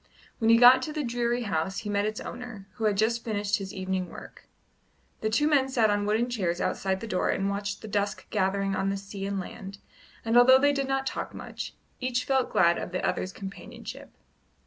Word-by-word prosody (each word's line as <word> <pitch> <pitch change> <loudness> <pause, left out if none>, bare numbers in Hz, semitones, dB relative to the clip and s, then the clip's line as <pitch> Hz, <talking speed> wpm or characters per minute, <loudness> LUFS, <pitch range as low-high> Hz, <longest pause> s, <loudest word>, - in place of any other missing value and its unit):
When 225 -2 +2
he 230 - +7
got 250 +2 +8
to 310 - -4
the 305 -1 -2
dreary 240 0 -1
house 190 -2 -1
he 210 - -6
met 205 +1 +1
its 215 0 -3
owner, 240 -6 -8
who 225 - -1
had 210 -2 +2
just 230 +3 +1
finished 210 -2 -1
his 195 -1 -6
evening 190 -1 -3
work. - - -12 0.7
The 220 - -1
two 295 +7 +2
men 275 -3 +3
sat 230 -5 +3
on 205 0 0
wooden 220 +3 +2
chairs 185 -8 -1
outside 190 0 -1
the 230 - -5
door 185 -4 0
and 195 +1 0
watched 200 +1 -4
the - - -6
dusk 205 0 -2
gathering 195 -1 0
on 195 +1 0
sea 195 0 -6
and 200 -1 -2
land, 195 +1 -8 0.5
and 225 +1 +1
although 260 +2 +8
they 285 +2 +3
did 275 -1 -1
not 270 0 0
talk - - -4
much, - - -7 0.2
each 250 -1 -1
felt 265 -1 +1
glad 170 0 +4
of - - -5
the 185 - 0
other's 185 - -2
companionship. 195 +1 -9
210 Hz, 210 wpm, -27 LUFS, 195-245 Hz, 0.7 s, got